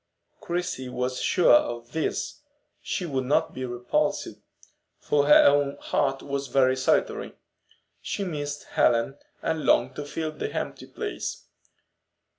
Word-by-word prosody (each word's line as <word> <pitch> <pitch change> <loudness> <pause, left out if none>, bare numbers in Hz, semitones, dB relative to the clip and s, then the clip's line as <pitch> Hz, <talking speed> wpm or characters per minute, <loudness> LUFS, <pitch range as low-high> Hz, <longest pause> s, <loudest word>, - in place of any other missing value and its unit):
Christie 170 -7 -3
was 125 +1 -2
sure 180 - +4
of 120 0 +2
this, 160 - -2 0.6
and 175 -5 -5
would 130 -1 0
not 140 - +1
be 130 - -4
repulsed; 120 0 -1 0.7
for 145 -1 +1
her 150 - +8
own 140 0 +3
heart 135 -1 0
was 140 0 -3
very 130 -1 +3
solitary. 130 0 0 0.7
She 200 - -3
missed 145 -5 -4
Helen, 120 +4 +2 0.2
and 160 -1 -1
longed - - +3
to 145 - -4
fill 155 +2 -3
the 155 - -5
empty - - -4
place. - - -5
140 Hz, 130 wpm, -26 LUFS, 130-150 Hz, 0.7 s, her